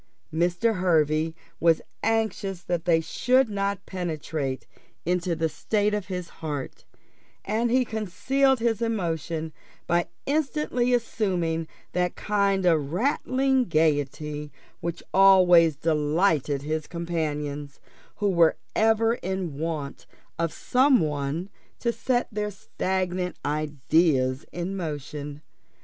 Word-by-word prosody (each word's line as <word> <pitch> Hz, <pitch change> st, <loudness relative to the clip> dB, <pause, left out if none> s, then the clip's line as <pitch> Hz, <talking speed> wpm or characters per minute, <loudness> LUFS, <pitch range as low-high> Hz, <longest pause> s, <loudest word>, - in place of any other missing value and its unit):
Mr. 175 Hz, +6 st, +1 dB
Hervey 160 Hz, -2 st, +2 dB, 0.2 s
was 165 Hz, -1 st, +4 dB, 0.2 s
anxious 210 Hz, -4 st, -1 dB
that 175 Hz, -2 st, -2 dB
they 165 Hz, -2 st, +4 dB
should 255 Hz, +8 st, +2 dB
not 200 Hz, -1 st, -2 dB
penetrate 155 Hz, -6 st, -3 dB, 0.4 s
into 175 Hz, 0 st, 0 dB
the 165 Hz, 0 st, +1 dB
state 205 Hz, +6 st, 0 dB
of 205 Hz, -3 st, -2 dB
his 180 Hz, -3 st, -4 dB
heart, 145 Hz, -4 st, -5 dB, 0.6 s
and 225 Hz, +4 st, 0 dB
he 255 Hz, +1 st, +3 dB
concealed 260 Hz, +6 st, +1 dB
his 230 Hz, -1 st, 0 dB
emotion 165 Hz, -7 st, -2 dB, 0.3 s
by 175 Hz, 0 st, +1 dB, 0.2 s
instantly 285 Hz, -4 st, 0 dB
assuming 180 Hz, -9 st, 0 dB, 0.2 s
that 180 Hz, 0 st, 0 dB
kind 200 Hz, -2 st, +1 dB
of 155 Hz, -5 st, +2 dB
rattling 260 Hz, -, +1 dB
gaiety 150 Hz, -, 0 dB, 0.3 s
which 170 Hz, 0 st, -4 dB
always 180 Hz, -4 st, +6 dB
delighted 150 Hz, -1 st, +1 dB
his 155 Hz, +1 st, -2 dB
companions, 150 Hz, -4 st, -3 dB, 0.4 s
who 205 Hz, -, 0 dB
were 170 Hz, -3 st, +4 dB, 0.2 s
ever 225 Hz, +1 st, +3 dB
in 185 Hz, -6 st, -3 dB
want 155 Hz, -4 st, -4 dB, 0.3 s
of 165 Hz, -1 st, 0 dB
some 260 Hz, -, +3 dB
one 150 Hz, +3 st, -2 dB, 0.3 s
to 235 Hz, -, 0 dB
set 245 Hz, +2 st, 0 dB
their 210 Hz, 0 st, -2 dB
stagnant 185 Hz, -2 st, -2 dB
ideas 145 Hz, -2 st, +1 dB
in 175 Hz, +3 st, -4 dB
motion. 150 Hz, -3 st, -5 dB
175 Hz, 110 wpm, -26 LUFS, 155-210 Hz, 0.6 s, always